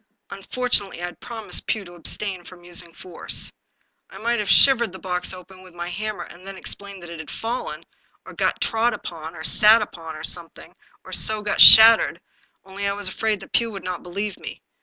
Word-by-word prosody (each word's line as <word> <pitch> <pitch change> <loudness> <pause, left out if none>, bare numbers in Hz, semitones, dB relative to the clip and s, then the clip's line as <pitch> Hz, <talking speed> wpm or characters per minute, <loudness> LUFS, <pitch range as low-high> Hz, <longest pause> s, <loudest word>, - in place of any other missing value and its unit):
Unfortunately 245 -8 -2
I 175 - -4
had 175 - -10
promised 225 -3 -2
Pugh 215 -3 -2
to 175 - -13
abstain 180 +2 -3
from 175 0 -15
using 175 -1 -4
force. 175 +1 -2 0.6
I - - -13
might 235 +1 -1
have 210 - -3
shivered 240 -6 +5
the - - -8
box 180 -1 -2
open 185 0 -13
with 185 -2 -17
my 175 0 -6
hammer, 215 +3 -5
and 180 +2 -14
then 195 -1 -8
explained 200 -1 -7
that 170 - -10
it 170 - -9
had 160 -2 -9
fallen, 235 +8 -5 0.4
or - - -11
got - - -1
trod 225 +2 0
upon, 160 0 -9
or 160 - -9
sat 215 +6 +5
upon, 165 -5 -10
or - - -9
something, 170 -2 -7 0.3
and - - -3
so 215 -1 +2
got 210 - 0
shattered, 225 0 +9 0.5
only 195 +1 -5
I 200 - -1
was 200 -1 -5
afraid 210 +1 -2
that - - -14
Pugh 230 -1 +2
would 195 -4 -9
not 180 -1 -5
believe 195 +3 -5
me. - - -10
195 Hz, 200 wpm, -22 LUFS, 175-215 Hz, 0.6 s, shattered